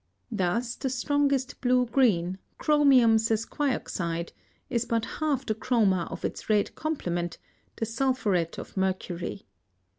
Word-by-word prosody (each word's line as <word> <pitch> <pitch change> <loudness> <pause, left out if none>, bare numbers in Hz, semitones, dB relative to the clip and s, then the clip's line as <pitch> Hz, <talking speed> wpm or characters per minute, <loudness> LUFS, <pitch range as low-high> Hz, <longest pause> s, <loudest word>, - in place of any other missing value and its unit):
Thus 220 +4 0
the 265 - -3
strongest 275 +1 0
blue 250 -1 +3
green, 195 -8 +2 0.2
chromium 275 -7 +5
sesquioxide, 220 - -1 0.4
is 235 -2 0
but 230 -2 0 0.2
half 290 -4 0
the 220 - 0
chroma 215 -6 +1
of - - -5
its - - -5
red 210 -2 +2
complement, 175 - -2 0.4
the 225 - -2
sulphuret 225 -8 0
of - - -8
mercury. 190 -1 -2
225 Hz, 120 wpm, -27 LUFS, 190-260 Hz, 0.4 s, chromium